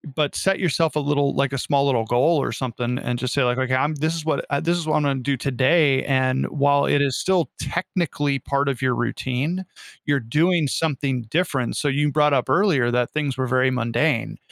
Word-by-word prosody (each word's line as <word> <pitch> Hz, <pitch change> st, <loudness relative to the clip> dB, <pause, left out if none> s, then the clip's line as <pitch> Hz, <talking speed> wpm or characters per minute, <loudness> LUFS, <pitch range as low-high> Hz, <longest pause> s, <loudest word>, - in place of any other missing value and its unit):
But 150 Hz, -2 st, 0 dB
set 195 Hz, 0 st, 0 dB
yourself 165 Hz, -2 st, 0 dB
a -, -, +2 dB
little 145 Hz, -1 st, 0 dB
like, 140 Hz, 0 st, +1 dB
a -, -, -1 dB
small 140 Hz, +2 st, +1 dB
little 120 Hz, -5 st, +1 dB
goal 140 Hz, +6 st, +2 dB
or -, -, -2 dB
something 125 Hz, +1 st, -3 dB
and 125 Hz, -2 st, -3 dB
just 125 Hz, +1 st, -3 dB
say 140 Hz, -, +2 dB
like, 125 Hz, +1 st, +1 dB
"Okay, 130 Hz, 0 st, -1 dB
I'm 150 Hz, +4 st, 0 dB
this 155 Hz, +3 st, -1 dB
is 160 Hz, -, -5 dB
what 155 Hz, -3 st, -1 dB, 0.2 s
this 170 Hz, +1 st, +1 dB
is 165 Hz, -, -4 dB
what 155 Hz, -, +2 dB
I'm -, -, +1 dB
gonna 135 Hz, -2 st, 0 dB
do 140 Hz, +2 st, 0 dB
today," 135 Hz, +2 st, +2 dB
and 130 Hz, -1 st, +1 dB
while 140 Hz, -1 st, +2 dB
it 145 Hz, -, +2 dB
is 135 Hz, -3 st, 0 dB
still 180 Hz, -7 st, +1 dB
technically 145 Hz, -5 st, -2 dB
part 140 Hz, 0 st, -1 dB
of 130 Hz, -1 st, -4 dB
your 130 Hz, -1 st, +2 dB
routine, 135 Hz, +9 st, -2 dB, 0.4 s
you're 145 Hz, -1 st, +1 dB
doing 155 Hz, +7 st, +1 dB
something 135 Hz, -5 st, -1 dB
different. 135 Hz, -1 st, -1 dB
So 145 Hz, -, -1 dB
you 145 Hz, +1 st, +1 dB
brought 150 Hz, -1 st, +3 dB
up 130 Hz, -, 0 dB
earlier 155 Hz, -11 st, +2 dB
that 125 Hz, 0 st, 0 dB
things 145 Hz, -3 st, -1 dB
were 130 Hz, -1 st, -1 dB
very 130 Hz, +1 st, +2 dB
mundane, 120 Hz, +2 st, -1 dB
140 Hz, 215 wpm, -22 LUFS, 130-155 Hz, 0.4 s, brought